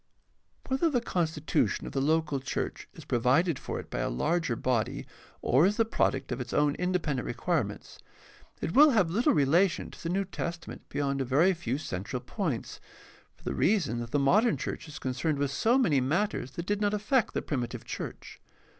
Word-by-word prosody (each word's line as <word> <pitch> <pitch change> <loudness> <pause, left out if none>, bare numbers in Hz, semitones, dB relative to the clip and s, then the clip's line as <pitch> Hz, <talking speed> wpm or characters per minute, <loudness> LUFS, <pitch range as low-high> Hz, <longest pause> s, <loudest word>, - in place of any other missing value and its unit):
— - - -28
Whether 270 +6 +2
the 260 -5 +2
constitution 160 -8 0
of - - -7
the 135 - 0
local 155 -1 +1
church 130 - -4
is - - -11
provided 130 +6 +2
for - - -4
it - - -10
by - - -3
a - - 0
larger 150 - 0
body 120 -2 -1 0.4
or 130 +5 +4
is 205 - -1
the 225 - +3
product 225 - 0
of 125 +1 -2
its 125 - -6
own 145 -1 +3
independent 175 -8 -1
requirements, 120 - -2 0.6
it - - -2
will 300 +2 +8
have 180 -5 +3
little 225 +7 +3
relation 165 +6 +2
to - - -13
the 165 - -3
New 195 +3 0
Testament 170 -2 -6
beyond 140 -1 -1
a - - +2
very 150 +9 +3
few 135 -7 -3
central 105 - -4
points, 155 - -4 0.5
for - - -25
the - - -2
reason 175 - +1
that 120 0 -5
the 145 - +1
modern 205 - +3
church - - -5
is 150 - -9
concerned 130 +4 -1
with 140 -1 0
so 225 - +3
many 155 - +3
matters 155 - 0
that 170 - -5
did 205 +2 -1
not 205 0 +2
affect 215 +3 +1
the - - 0
primitive 125 -5 -3
church. - - -7
155 Hz, 190 wpm, -29 LUFS, 130-190 Hz, 0.6 s, will